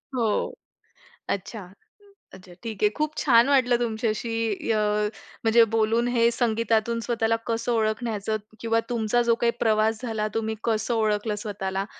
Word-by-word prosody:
हो, 230 Hz, -3 st, +1 dB, 1.0 s
अच्छा. 200 Hz, +1 st, -4 dB, 0.7 s
अच्छा 185 Hz, -1 st, -13 dB
ठीक 220 Hz, -3 st, -5 dB
आहे. 210 Hz, -, +6 dB
खूप 305 Hz, 0 st, -2 dB
छान 245 Hz, -1 st, +4 dB
वाटलं 250 Hz, -3 st, +3 dB
तुमच्याशी 225 Hz, -1 st, -1 dB
अ, 215 Hz, -, +1 dB, 0.6 s
म्हणजे 225 Hz, +1 st, +6 dB
बोलून. 225 Hz, +2 st, +2 dB
हे 235 Hz, -1 st, +3 dB
संगीतातून 230 Hz, -1 st, 0 dB
स्वतःला 230 Hz, -1 st, 0 dB
कसं 230 Hz, +1 st, -1 dB
ओळखण्याचं 220 Hz, -1 st, -1 dB, 0.2 s
किंवा 230 Hz, 0 st, +1 dB
तुमचा 235 Hz, 0 st, +1 dB
जो 235 Hz, -1 st, +3 dB
काही 235 Hz, -, +4 dB
प्रवास 220 Hz, 0 st, +2 dB
झाला, 220 Hz, -3 st, -2 dB
तुम्ही 220 Hz, 0 st, -2 dB
कसं 225 Hz, +1 st, 0 dB
ओळखलं 215 Hz, -1 st, 0 dB
स्वतःला. 195 Hz, -2 st, -3 dB
225 Hz, 135 wpm, -25 LUFS, 215-235 Hz, 1.0 s, आहे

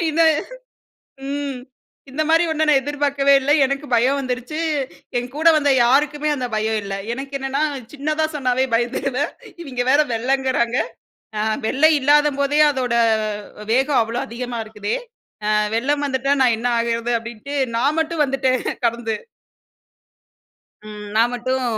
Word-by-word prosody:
இந்த 325 Hz, +2 st, +2 dB, 1.0 s
ம் 280 Hz, -2 st, -3 dB, 0.5 s
இந்தமாரி 320 Hz, +4 st, +2 dB
ஒன்ன 315 Hz, 0 st, +1 dB
நான் 280 Hz, -3 st, +5 dB
எதிர்பார்க்கவே 280 Hz, -1 st, +1 dB
இல்ல. 270 Hz, +2 st, -2 dB
எனக்கு 275 Hz, +2 st, -2 dB
பயம் 255 Hz, +4 st, +3 dB
வந்துருச்சு, 255 Hz, +4 st, -4 dB, 0.6 s
என் 245 Hz, +1 st, -3 dB
கூட 320 Hz, +2 st, +2 dB
வந்த 285 Hz, -2 st, +2 dB
யாருக்குமே 295 Hz, +4 st, +2 dB
அந்தப் 250 Hz, -4 st, -4 dB
பயம் 220 Hz, +1 st, 0 dB
இல்ல. 195 Hz, -, -5 dB, 0.2 s
எனக்கு 270 Hz, +3 st, -7 dB
என்னன்னா, 270 Hz, +2 st, -2 dB, 0.3 s
சின்னதா 305 Hz, +2 st, -1 dB
சொன்னாவே 260 Hz, -2 st, +1 dB
பயந்துருவேன். 250 Hz, +4 st, 0 dB, 0.3 s
இவங்க 255 Hz, -5 st, -4 dB
வேற 285 Hz, -, +4 dB
வெள்ளங்கிறாங்க. 255 Hz, 0 st, 0 dB, 0.6 s
அ -, -, 0 dB, 0.3 s
வெள்ள 275 Hz, +6 st, +1 dB
இல்லாதம்போதே 290 Hz, 0 st, +2 dB
அதோட 255 Hz, -3 st, -1 dB, 0.8 s
வேகம் 270 Hz, +2 st, +3 dB
அவ்ளோ 230 Hz, +2 st, -3 dB
அதிகமா 240 Hz, +1 st, -5 dB
இருக்குதே, 210 Hz, -1 st, -4 dB, 0.6 s
அ -, -, +3 dB, 0.2 s
வெள்ளம் 285 Hz, +5 st, 0 dB
வந்துட்டா 275 Hz, +1 st, +1 dB
நான் 245 Hz, -3 st, +4 dB
என்ன 245 Hz, -, -1 dB
ஆகுறது 230 Hz, +1 st, -1 dB
அப்டின்டு 235 Hz, +5 st, -7 dB, 0.2 s
நான் 285 Hz, +7 st, +1 dB
மட்டும் 320 Hz, -1 st, 0 dB
வந்துட்டேன் 265 Hz, -2 st, 0 dB, 0.2 s
கடந்து. 230 Hz, -1 st, -2 dB, 1.7 s
ம் 210 Hz, -1 st, -8 dB
நான் 230 Hz, +2 st, +4 dB
மட்டும் 255 Hz, +2 st, -1 dB
265 Hz, 130 wpm, -20 LUFS, 240-290 Hz, 1.7 s, நான்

